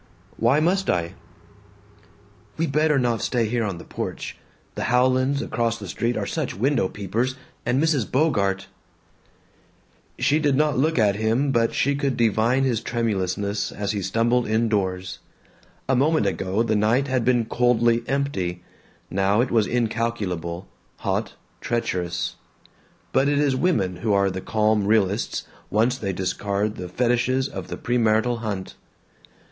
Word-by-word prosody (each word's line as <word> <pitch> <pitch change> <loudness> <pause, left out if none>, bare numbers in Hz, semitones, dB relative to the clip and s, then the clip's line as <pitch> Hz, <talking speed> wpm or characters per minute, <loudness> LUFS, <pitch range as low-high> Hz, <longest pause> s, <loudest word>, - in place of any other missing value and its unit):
"Why 120 +6 +3
must 185 +5 +1
I?" 85 -1 0 1.4
"We 165 - +1
better 150 0 +2
not 120 -3 +1
stay 120 -3 +1
here 120 +1 0
on 100 -5 -3
the - - -9
porch. - - -5 0.4
The - - -3
Howlands 130 +2 +2
across 115 -1 -1
the 100 -3 -8
street 115 +7 -1
are - - -1
such 155 -5 -3
window 120 0 +1
peepers, 110 +6 -2 0.3
and 125 +2 +2
Mrs. 150 -6 +1
Bogart 100 -10 +1 0.8
" - - -36
She 150 - +4
did 145 -3 +2
not 150 0 +2
look 155 +4 +1
at 105 -3 +3
him 115 +6 +1
but 115 -2 +1
she 140 - +2
could 140 -2 -1
divine 115 +3 +2
his 120 -4 +1
tremulousness 100 -3 -1
as 100 -1 -3
he 105 -2 -2
stumbled 115 +5 +1
indoors. 100 -5 0 0.7
A 135 - +2
moment 150 0 +2
ago 95 +2 0
the 110 -2 0
night 115 +6 +2
had 130 -2 0
been 120 -1 +2
coldly 120 0 +2
empty; 95 -11 -2 0.5
now 100 +2 +2
it 125 +1 +1
was 110 -3 +3
incalculable, 105 -7 -2 0.3
hot, - - -2 0.3
treacherous. 90 -6 -2 0.8
But 135 +2 +3
it 145 - +1
is 140 -2 +2
women 115 - +1
who 105 +3 0
are 100 -1 +3
the 95 0 -5
calm 105 -1 +1
realists 105 -1 +1 0.2
once 115 +4 +2
they 105 -7 -3
discard 100 +3 -2
the 90 -1 -6
fetishes 125 +5 +1
of - - -7
the - - -5
premarital 115 0 +1
hunt. 100 -4 -4
115 Hz, 150 wpm, -23 LUFS, 100-130 Hz, 1.4 s, She